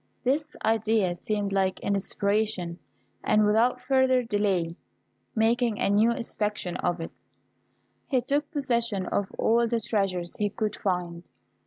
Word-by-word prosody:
This 295 +4 0
idea 220 -4 +2
seemed 205 +2 -2
like 190 -1 +1
inspiration, 200 -2 -1 0.4
and 215 0 +3
without 225 +4 +3
further 260 -1 +3
delay, 200 -7 0 0.6
making 230 0 +2
a - - +1
new 215 +3 +4
inspection 210 -6 -2
of 175 0 -1
it, 165 - -5 1.0
he 265 -4 +2
took 285 +4 -1
possession 235 - -1
of 200 -1 -1
all 235 +1 +3
the 230 0 0
treasures 195 -6 -1
he 205 -1 0
could 215 +1 -2
find. 180 -3 -2
215 Hz, 130 wpm, -27 LUFS, 195-235 Hz, 1.0 s, new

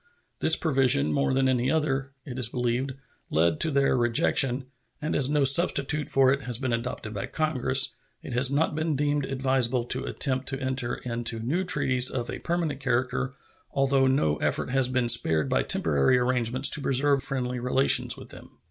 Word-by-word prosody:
This 160 - +3
provision, 140 -2 +2
more 140 -1 0
than 130 0 +1
any 130 -1 0
other, 140 -3 -1
it 130 -2 -7
is 120 -3 +2
believed, 125 +2 -2 0.4
led 80 0 +1
to - - +2
their 140 -2 +1
rejection; 125 +2 +1 0.3
and 150 - -3
as 135 -2 +3
no 150 -1 +1
substitute 145 0 +3
for 135 -1 +3
it 140 - -3
has 125 -3 -4
been 130 -1 -3
adopted 115 -2 -5
by 100 - -5
Congress, 140 -4 +1 0.3
it - - -7
has 125 +2 +3
not 145 +3 0
been 155 0 -2
deemed 145 0 -1
advisable 130 -2 0
to 130 +2 -1
attempt 130 -1 -2
to 135 -1 -4
enter 130 -2 -3
into 115 -1 -3
new 145 +12 -2
treaties 130 -8 +2
of 120 -2 -4
a - - -6
permanent 165 -5 -3
character, 130 0 -2 0.4
although 135 -1 +2
no 80 - +1
effort - - -2
has 135 -1 +1
been 130 -1 0
spared 80 -10 +2
by - - +1
temporary 75 - +2
arrangements 125 +1 +2
to 150 - +3
preserve 140 +1 +1
friendly 125 -1 -4
relations 125 +2 +2
with - - -12
them. - - -9
130 Hz, 180 wpm, -26 LUFS, 125-140 Hz, 0.4 s, This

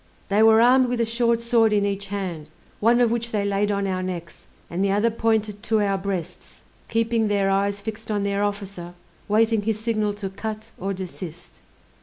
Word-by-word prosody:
They 205 +2 +3
were 220 0 +7
armed 255 +2 +5
with 245 -1 -2
a 230 - +2
short 235 0 +1
sword 235 -2 +3
in 205 -1 +2
each 200 0 -2
hand, 185 -6 -5 0.3
one 235 +3 +4
of 235 -2 +3
which 235 0 -1
they 205 -2 0
laid 200 +1 +1
on 200 0 0
our 185 -1 -1
necks, 175 -2 -6 0.2
and 180 +3 -2
the 200 - +2
other 210 +4 +2
pointed 220 -2 0
to 220 -1 +1
our 200 -2 +1
breasts, 185 -4 -5 0.3
keeping 225 0 +1
their 200 -1 +1
eyes 200 +1 +1
fixed 215 +1 -7
on 205 -2 0
their 200 0 0
officer, 200 -4 -4 0.3
waiting 220 +1 +3
his 215 0 -1
signal 215 -2 -1
to 200 -2 -5
cut 215 +2 -6
or 195 +1 -2
desist. 180 -2 -8
205 Hz, 195 wpm, -23 LUFS, 195-225 Hz, 0.3 s, were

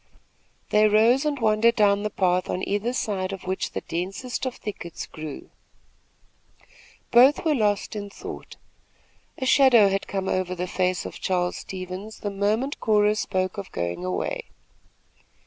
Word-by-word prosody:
They 210 0 +5
rose 230 +6 +4
and 295 -1 0
wandered 225 +1 +3
down 205 -1 +3
the 210 - -1
path 185 -2 +1
on 185 - -2
either 205 +4 0
side 200 -6 -2
of 195 - -7
which 190 +1 -3
the - - -3
densest 195 +10 -4
of 255 - -4
thickets 175 -5 -7
grew. 155 -2 -9 1.6
Both 260 +7 +6
were 315 - +3
lost 210 -5 0
in 205 -1 -5
thought. - - -9 0.8
A 260 - -3
shadow 255 -6 +6
had 195 0 -2
come 195 -1 -3
over 185 -1 -1
the 180 0 -3
face 185 0 -1
of - - -7
Charles 180 -1 0
Stevens 185 +3 -7
the 205 - -3
moment 215 +8 -1
Cora 210 -1 +3
spoke 190 -1 -2
of 195 - -8
going 85 0 -3
away. 90 0 -2
200 Hz, 150 wpm, -25 LUFS, 185-220 Hz, 1.6 s, Both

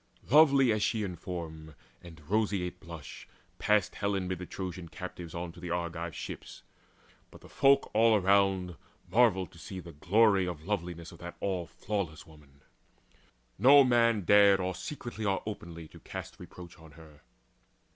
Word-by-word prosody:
Lovely 140 -4 +6
as 105 -1 0
she 110 +1 0
in 90 -3 -4
form 80 -3 -7 0.3
and 80 -4 -14
roseate 100 -3 -1
blush 85 -4 -10 0.3
Passed 105 -1 +2
Helen 100 -2 -2
mid 90 -1 -3
the 90 - -7
Trojan 90 -2 -6
captives 90 -2 -8
on 85 0 -4
To 85 - -15
the 90 0 -7
Argive 85 -2 -3
ships. - - -8 0.7
But - - -16
the - - -14
folk 140 0 +3
all 115 +1 +5
around 95 -2 +2 0.3
Marvelled 95 -2 +2
to 85 - -16
see 95 +3 -7
the 85 -1 -10
glory 95 +4 +3
of 80 -3 -6
loveliness 85 -4 -4
Of - - -14
that 85 0 -9
all 90 -4 -2
flawless 95 -6 -4
woman. 70 -3 -19 1.0
No 140 +5 +8
man 115 -3 +3
dared 100 +1 +6
Or 95 0 -2
secretly 120 - -7
or 100 -2 0
openly 85 -6 -7
to - - -14
cast - - -8
Reproach 85 -3 -12
on 80 -2 -15
her. 75 -1 -16
90 Hz, 160 wpm, -30 LUFS, 85-105 Hz, 1.0 s, No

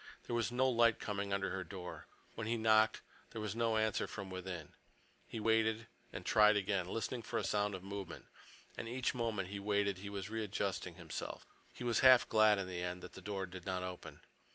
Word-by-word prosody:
There 120 - -2
was 115 0 0
no 130 +2 +3
light 115 -2 +4
coming 100 -1 -3
under 100 0 0
her 95 0 -2
door. 90 0 -8 0.3
When 110 -1 -4
he 115 +1 +1
knocked, 110 0 +4 0.3
there 115 - -7
was 105 -1 -3
no 115 -1 +2
answer 110 0 +1
from 100 -3 -7
within. 90 -4 -6 0.5
He 115 - -5
waited, 110 0 +2 0.3
and - - -7
tried 105 -1 +6
again, 100 -2 0
listening 115 +4 -3
for - - -3
a - - 0
sound 105 +1 +1
of 95 - -8
movement. 100 -1 -6 0.5
And 115 - -5
each 125 +2 0
moment 110 -6 -1
he 100 0 -4
waited 100 -1 +1
he 100 +1 -6
was 100 -2 -4
readjusting 100 -5 -2
himself. 85 -4 -6 0.3
He - - -8
was 120 -2 +2
half 130 -2 +8
glad, 110 -1 +5
in 95 -1 -2
the 90 -1 -4
end, 90 0 -4
that - - -9
the 95 - -10
door 95 0 -3
did 90 0 -10
not 90 -1 -1
open. 90 -1 -7
105 Hz, 205 wpm, -36 LUFS, 95-110 Hz, 0.5 s, half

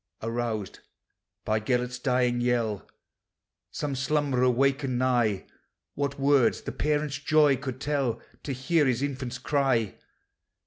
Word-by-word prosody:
Aroused 115 -3 -3 0.7
by 110 0 +1
Gelert's 125 +2 -1
dying 125 -2 +1
yell, 115 -4 0 0.8
Some 145 -2 -3
slumberer 135 -2 +1
wakened 135 +1 +1
nigh: 120 -6 +1 0.5
What 140 -1 -2
words 140 -2 +3
the - - -4
parent's 150 -1 -1
joy 150 -1 +4
could 130 0 -6
tell 140 -5 -1 0.2
To 140 - -5
hear 140 +4 +1
his 130 +1 0
infant's 130 -3 -3
cry 130 -6 0
130 Hz, 120 wpm, -27 LUFS, 120-140 Hz, 0.8 s, joy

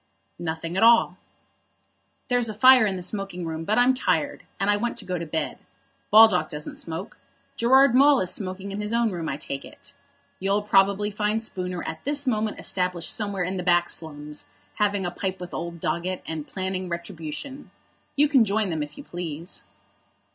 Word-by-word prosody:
"Nothing 165 0 -4
at 195 - +1
all." 230 +1 +5 1.1
"There's 245 -2 +1
a 215 - -5
fire 255 0 +7
in 195 - -1
the 180 - -5
smoking 195 -2 -4
room, 160 0 -4
but 215 +4 +1
I'm 245 +2 +5
tired, 285 +2 0 0.2
and 195 - 0
I 205 - +4
want 235 +3 -2
to 205 - -5
go 180 -1 -2
to 170 - -5
bed. 160 +1 -3 0.5
Baldock 215 -4 +6
doesn't 150 -2 -6
smoke. 180 +7 -6 0.4
Gerard 260 +2 +5
Maule 280 +1 +6
is 185 -1 -1
smoking 190 0 -5
in 200 +1 -4
his 210 +2 -3
own 235 -2 +2
room, 170 -3 -4
I 135 - -3
take 140 -2 -6
it. - - -15 0.5
You'll 195 +2 0
probably 200 0 +3
find 210 +1 0
Spooner 180 -5 -5
at 160 - -6
this 285 0 0
moment 220 -4 -1
established 180 -2 -1
somewhere 200 -3 -2
in 185 +2 -3
the - - -2
back 175 -1 +3
slums, 150 -2 -5 0.3
having 205 -2 0
a 175 - -2
pipe 190 +1 -4
with 180 -1 -8
old 170 0 -5
Doggett, 180 +3 -2
and 155 -2 -5
planning 185 -1 -4
retribution. 170 - -6 0.5
You 295 +1 +4
can 275 -5 +5
join 210 -2 0
them 160 -2 -2
if 150 0 -6
you - - -8
please." 170 -1 -6
190 Hz, 185 wpm, -25 LUFS, 170-220 Hz, 1.1 s, fire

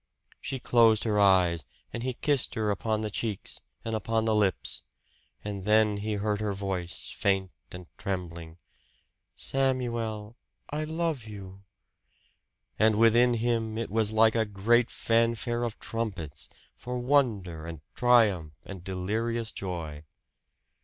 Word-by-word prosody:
She 135 - -4
closed 115 -3 +4
her 105 -2 +1
eyes, 90 -4 +4 0.3
and 120 - -3
he 125 0 -2
kissed 145 -1 0
her 110 -1 +1
upon 110 +2 -1
the 110 -1 -3
cheeks 105 -2 -3 0.2
and 115 - -2
upon 110 0 0
the 110 - +2
lips; 105 -3 +1 0.6
then 105 +1 +2
he 105 +1 -2
heard 105 0 -1
her 105 -2 -1
voice, 95 -3 -3
faint 95 -2 +1 0.2
and 90 0 -8
trembling 85 -4 -5 0.8
"Samuel, 120 -5 -1 0.4
I 155 +1 -2
love 160 -6 -2
you!" 100 -2 -9 1.2
And 110 0 +5
within 120 +2 +5
him 115 -1 0
it 115 -4 -3
was 110 -1 +2
like 110 0 +5
a 115 - +2
great 110 +4 +2
fanfare 115 +1 +1
of 120 -2 -3
trumpets, 85 -11 -5 0.3
for 125 0 -5
wonder 110 - +1
and 80 -3 -7
triumph 105 - +3
and 95 -3 -8
delirious 110 +5 -2
joy. 85 -6 -5
110 Hz, 130 wpm, -28 LUFS, 95-115 Hz, 1.2 s, And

